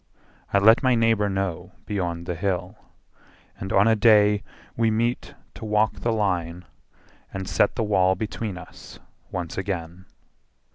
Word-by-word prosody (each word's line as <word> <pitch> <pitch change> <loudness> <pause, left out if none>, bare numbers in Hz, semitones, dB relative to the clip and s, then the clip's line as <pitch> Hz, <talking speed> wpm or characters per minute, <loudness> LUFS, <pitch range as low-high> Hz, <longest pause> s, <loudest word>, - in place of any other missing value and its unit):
I - - +3
let 110 +4 +6
my 130 -3 +3
neighbour 115 -3 +2
know 95 -1 -3
beyond 85 -4 -3
the 90 - -3
hill; 90 +2 -2 0.8
And 95 - -5
on 100 +3 +4
a 110 - +4
day 105 -2 +5 0.3
we 115 -1 +2
meet 115 +3 -1 0.2
to - - -11
walk 105 0 +1
the 115 - 0
line 90 -5 -1 0.7
And 95 -1 -5
set 100 - +2
the - - 0
wall 95 -3 +2
between 105 0 -4
us - - -12 0.3
once 90 0 -4
again. 90 -1 -5
100 Hz, 145 wpm, -24 LUFS, 90-110 Hz, 0.8 s, let